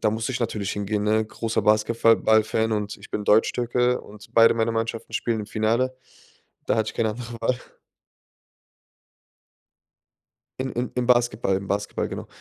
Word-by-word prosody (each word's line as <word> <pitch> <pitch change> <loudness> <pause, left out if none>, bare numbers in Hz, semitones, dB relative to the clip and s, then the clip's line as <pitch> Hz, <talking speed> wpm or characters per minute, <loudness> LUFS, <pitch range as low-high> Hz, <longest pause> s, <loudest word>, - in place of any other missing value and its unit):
Da 110 - +2
musste 110 +4 -2
ich 125 - -3
natürlich 105 -4 -2
hingehen, 105 0 -2
ne? 110 +1 +2
Großer 110 0 -2
Basketfa 110 +2 +4
ball-Fan 110 0 +2
und 105 -1 -2
ich - - -14
bin 105 - -3
Deutschtürke 120 +3 +2
und 105 0 -14
beide 115 0 +6
meiner 115 0 0
Mannschaften 115 0 -3
spielen 115 -2 -1
im 105 - -6
Finale. 115 +5 0 0.7
Da - - +1
hatte 110 -1 0
ich - - -10
keine 110 - 0
andere 120 +2 -6
Wahl. 125 -1 0 3.0
Im 130 0 -2
im 120 +1 -2
im 125 -1 0
Basketball, 120 -5 +2
im 100 0 -7
Basketball, 100 +1 -2
genau. - - -6
110 Hz, 160 wpm, -24 LUFS, 105-120 Hz, 3.0 s, beide